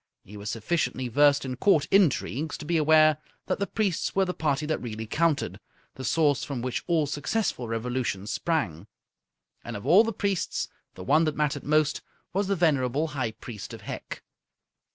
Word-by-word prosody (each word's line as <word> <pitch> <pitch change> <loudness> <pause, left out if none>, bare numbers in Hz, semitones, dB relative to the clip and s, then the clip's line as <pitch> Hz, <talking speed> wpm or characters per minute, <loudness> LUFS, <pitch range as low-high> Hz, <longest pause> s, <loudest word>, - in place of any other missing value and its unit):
He 105 - -13
was 105 +1 -6
sufficiently 130 +2 -1
versed 145 +2 +4
in 130 -1 -4
Court 155 -5 +3
intrigues 160 - +2
to 150 - -9
be 170 +3 0
aware 155 -1 +5 0.3
that 185 - -1
the 200 - -1
priests 200 -7 -1
were 195 0 +3
the 180 - -2
party 150 -2 0
that 155 0 -1
really 110 -2 -5
counted, 155 +5 0 0.3
the 130 - -8
source 145 +1 +2
from 130 -4 -4
which 125 -3 -2
all 165 -4 +2
successful 145 - -2
revolutions 115 -3 -2
sprang. 105 - -1 0.8
And - - -5
of 100 - -10
all 195 +6 +7
the 225 - -1
priests 200 -3 -1 0.3
the 95 - -8
one 155 - +4
that 155 -1 -1
mattered 150 -2 -1
most 150 0 +2 0.3
was 195 +1 0
the 200 - +1
venerable 150 -3 +1
High 130 -7 -2
Priest 110 -1 -8
of - - -13
Hec. - - -7
150 Hz, 175 wpm, -27 LUFS, 125-165 Hz, 0.8 s, all